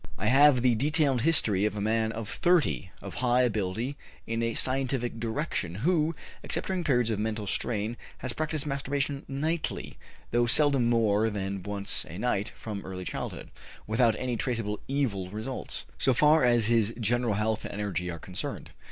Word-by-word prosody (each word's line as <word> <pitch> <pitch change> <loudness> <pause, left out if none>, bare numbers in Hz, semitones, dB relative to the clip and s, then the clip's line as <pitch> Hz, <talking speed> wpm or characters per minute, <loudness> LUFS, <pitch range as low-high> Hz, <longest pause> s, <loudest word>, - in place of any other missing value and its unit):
I - - -3
have 135 -1 +6
the 125 -2 +5
detailed 140 +1 +2
history 110 -11 +3
of 105 0 0
a - - -3
man 110 +1 +1
of 115 -1 -5
30, 170 - +1
of - - -7
high 125 0 +3
ability 115 +4 -1 0.3
in 115 0 -2
a 115 -1 -1
scientific 130 -3 0
direction, 110 - -2
who, 165 -2 +2 0.3
except - - -2
during 185 -2 -2
periods 125 -6 +2
of 105 - -1
mental 110 0 -2
strain, 110 +3 -1 0.2
has 130 -1 -3
practiced 155 0 -1
masturbation 140 0 -2
nightly 155 +4 -3 0.3
(though 120 0 +2
seldom 135 -2 +5
more 110 -2 +3
than 100 -2 -3
once 100 +1 -2
a 85 - -7
night) 105 -1 -1
from 105 -3 -6
early 90 -1 -6
childhood, - - -5 0.3
without 115 +1 +3
any 125 -1 -2
traceable 110 -4 -2
evil 115 -10 -1
results, 110 +6 -5
so 130 -2 +3
far 150 +2 +5
as 120 -2 +4
his 115 -1 +2
general 120 0 +1
health 110 +1 -1
and - - -6
energy 95 -4 -2
are 85 - -4
concerned. 90 +2 -5
115 Hz, 170 wpm, -28 LUFS, 105-135 Hz, 0.3 s, have